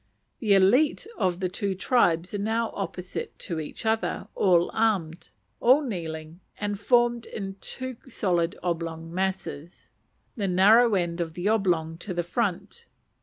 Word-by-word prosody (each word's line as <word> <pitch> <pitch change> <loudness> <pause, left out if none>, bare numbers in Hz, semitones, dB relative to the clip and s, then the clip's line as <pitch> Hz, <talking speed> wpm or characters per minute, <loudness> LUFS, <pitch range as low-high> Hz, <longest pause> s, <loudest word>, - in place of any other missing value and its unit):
The 215 -4 +3
élite 235 - +4
of 180 - 0
the 185 - +1
two 195 +1 -2
tribes 180 -4 +2
are 205 - -2
now 225 +2 0
opposite 185 -2 -5
to 170 -4 -4
each 155 +8 -7
other, 220 0 0
all 175 -3 +3
armed, 185 -7 0 0.3
all 260 +5 +5
kneeling, 165 - -5 0.2
and 205 -1 -3
formed 240 0 +2
in 195 -2 -6
two 255 -2 -5
solid 175 -8 0
oblong 165 -1 -3
masses, 185 -3 -4 0.4
the 205 -5 -1
narrow 210 +5 +5
end 175 -2 -1
of 160 -1 -4
the 180 +3 -2
oblong 170 -7 +1
to 185 -2 -5
the 175 - 0
front. 210 - -3
190 Hz, 145 wpm, -26 LUFS, 170-225 Hz, 0.4 s, all